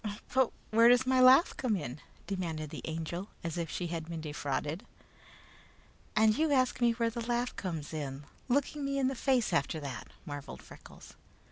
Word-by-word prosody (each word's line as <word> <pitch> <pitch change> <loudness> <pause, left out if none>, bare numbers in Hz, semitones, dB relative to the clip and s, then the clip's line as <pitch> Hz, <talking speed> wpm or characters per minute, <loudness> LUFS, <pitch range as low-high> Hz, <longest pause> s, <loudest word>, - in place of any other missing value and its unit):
"But 260 -2 +3 0.2
where 230 +2 +7
does 245 +1 +5
my 260 0 +3
laugh 260 +6 +7
come 245 -5 0
in?" 145 -6 -5 0.2
demanded 165 -6 -3
the - - -6
Angel, 165 +4 -4
as 165 -1 -3
if 170 -2 -3
she 180 - -3
had 165 -1 -4
been 165 -1 -4
defrauded. 150 +2 -3 1.3
"And 215 0 +5
you 315 +1 +1
ask 255 -2 +2
me 235 -1 +4
where 230 0 0
the 235 +1 -4
laugh 240 +1 0
comes 165 -5 -5
in, 140 -2 -5 0.2
looking 285 +3 0
me 275 0 -1
in 265 -1 +2
the - - -2
face 250 -5 +1
after 160 0 +1
that," 135 -4 -6 0.2
marveled 145 -1 -7
Freckles. - - -14
195 Hz, 175 wpm, -31 LUFS, 155-255 Hz, 1.3 s, where